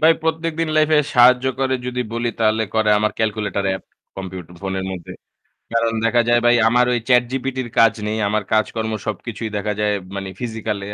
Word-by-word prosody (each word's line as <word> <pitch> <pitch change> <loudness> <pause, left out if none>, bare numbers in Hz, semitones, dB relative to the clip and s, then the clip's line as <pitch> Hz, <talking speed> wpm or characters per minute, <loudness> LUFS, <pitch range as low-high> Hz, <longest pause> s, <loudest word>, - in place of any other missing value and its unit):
ভাই 160 +1 +6
প্রত্যেকদিন 160 0 -1
life 155 0 +3
এ - - +6
সাহায্য 125 +1 +6
করে 130 -1 +1
যদি 125 0 -2
বলি 120 0 -1
তাহলে 110 0 +2
করে 110 -1 +3
আমার 105 +1 +1
calculator 105 -3 -1
app, - - -14 0.3
computer 95 -2 -7
ফোনের 95 -1 -3
মধ্যে। 90 -3 -8 0.6
কারণ 115 0 +1
দেখা 120 +1 +3
যায় 120 0 +4
ভাই 120 0 +5
আমার 125 +2 +4
ওই 120 - +2
ChatGPT 130 +1 +1
র - - -8
কাজ 115 -1 +5
নেই, 110 +1 -2
আমার 105 +1 0
কাজকর্ম 110 0 0
সবকিছুই 110 +1 -4
দেখা 105 +1 -1
যায় 105 -1 +1 0.2
মানে 95 -1 -5
physically 110 -4 -4
115 Hz, 180 wpm, -20 LUFS, 105-125 Hz, 0.6 s, ভাই